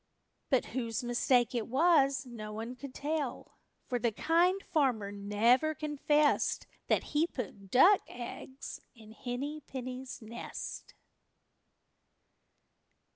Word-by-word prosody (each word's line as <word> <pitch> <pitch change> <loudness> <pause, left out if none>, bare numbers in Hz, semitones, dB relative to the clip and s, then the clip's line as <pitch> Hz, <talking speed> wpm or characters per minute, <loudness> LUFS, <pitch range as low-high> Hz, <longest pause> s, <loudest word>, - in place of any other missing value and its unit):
But 260 -4 +3
whose 235 0 -3
mistake 240 0 +2
it 235 -3 -1
was 275 -1 +4
no 220 -4 -7
one 225 +4 -5
could 255 +2 -8
tell, 290 -3 -3 0.3
for 245 -2 -1
the 235 -1 +1
Kind 350 - +2
Farmer 250 - +1
never 225 +9 +2
confessed 295 0 +2 0.2
that - - +2
he 310 +3 +1
put 205 - -7
duck 365 - +7
eggs 250 +2 -8
in 220 -2 -14
Henny 270 +6 -4
Penny's 255 0 -6
nest. 230 0 -7
255 Hz, 110 wpm, -32 LUFS, 235-295 Hz, 0.3 s, duck